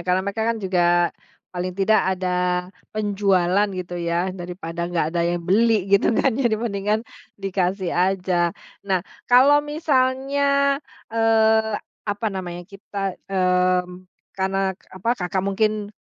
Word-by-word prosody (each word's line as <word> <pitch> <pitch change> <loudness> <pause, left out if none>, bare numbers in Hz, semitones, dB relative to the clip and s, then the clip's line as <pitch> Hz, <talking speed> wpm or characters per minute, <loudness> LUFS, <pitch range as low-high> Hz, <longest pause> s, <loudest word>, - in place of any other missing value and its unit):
karena 180 +1 +2
mereka 200 +2 -2
kan 230 - +1
juga 185 -1 +1 0.7
paling 180 0 -3
tidak 205 +3 +3 0.2
ada 185 0 -2 0.7
penjualan 200 -2 +2
gitu 180 -1 -5
ya, 170 +2 0
daripada 175 -2 -7
nggak 170 -3 0
ada 175 - 0
yang 175 0 -2
beli 225 +4 +4 0.2
gitu 200 - +5
kan 270 - +3
ya, 255 - +3
dibandingkan 215 -1 -1 0.4
dikasih 190 -1 -1
aja. 185 0 +1 0.5
Nah, 190 -2 +1 0.3
kalau 265 +4 +6
misalnya, 280 -1 +1 0.3
eee, 220 -1 +3 0.3
apa 205 +2 -2
namanya, 175 -2 -5
kita 195 0 -5
mmm, 180 -1 +1 0.3
karena 190 0 -1 0.4
apa 190 +5 -4
Kakak 185 +1 -1
mungkin 210 +1 0
195 Hz, 125 wpm, -22 LUFS, 180-220 Hz, 0.7 s, kalau